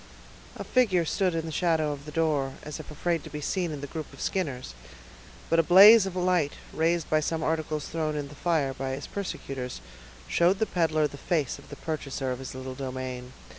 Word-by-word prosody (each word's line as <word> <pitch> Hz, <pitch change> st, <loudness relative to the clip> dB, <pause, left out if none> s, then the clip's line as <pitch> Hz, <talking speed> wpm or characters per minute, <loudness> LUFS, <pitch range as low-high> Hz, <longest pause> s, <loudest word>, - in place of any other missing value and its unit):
A -, -, -5 dB
figure 200 Hz, -10 st, +2 dB
stood 185 Hz, +1 st, +1 dB
in 165 Hz, 0 st, -1 dB
the 160 Hz, -, -5 dB
shadow 160 Hz, -2 st, +1 dB
of 145 Hz, 0 st, -7 dB
the 150 Hz, -, -8 dB
door, 150 Hz, -4 st, 0 dB
as 150 Hz, 0 st, -6 dB
if 155 Hz, -, -9 dB
afraid 165 Hz, +1 st, -1 dB
to -, -, -9 dB
be 150 Hz, -, -6 dB
seen 175 Hz, +3 st, -1 dB
in 145 Hz, -2 st, -5 dB
the -, -, -4 dB
group 160 Hz, -2 st, -5 dB
of -, -, -14 dB
Skinners; 140 Hz, -, -2 dB, 0.7 s
but 165 Hz, -, +3 dB
a -, -, +8 dB
blaze 195 Hz, +5 st, +9 dB
of 185 Hz, -, -6 dB
light, 180 Hz, -5 st, +2 dB, 0.2 s
raised 165 Hz, 0 st, +1 dB
by 155 Hz, -, +3 dB
some 160 Hz, +1 st, -1 dB
articles 155 Hz, -2 st, -1 dB
thrown 155 Hz, -2 st, -2 dB
in 145 Hz, -1 st, -3 dB
the 145 Hz, -, -12 dB
fire 150 Hz, -4 st, 0 dB
by 130 Hz, 0 st, -3 dB
his 140 Hz, -, -7 dB
persecutors, 135 Hz, -, -5 dB, 0.5 s
showed 175 Hz, +3 st, +3 dB
the 220 Hz, -, +1 dB
peddler 160 Hz, -5 st, +1 dB
the 145 Hz, -, -5 dB
face 150 Hz, -3 st, -1 dB
of -, -, -16 dB
the 145 Hz, -, -7 dB
purchaser 140 Hz, -4 st, -3 dB
of 125 Hz, -, -4 dB
his 135 Hz, -1 st, -7 dB
little 130 Hz, 0 st, -6 dB
domain. 130 Hz, -1 st, -5 dB
155 Hz, 210 wpm, -27 LUFS, 140-170 Hz, 0.7 s, blaze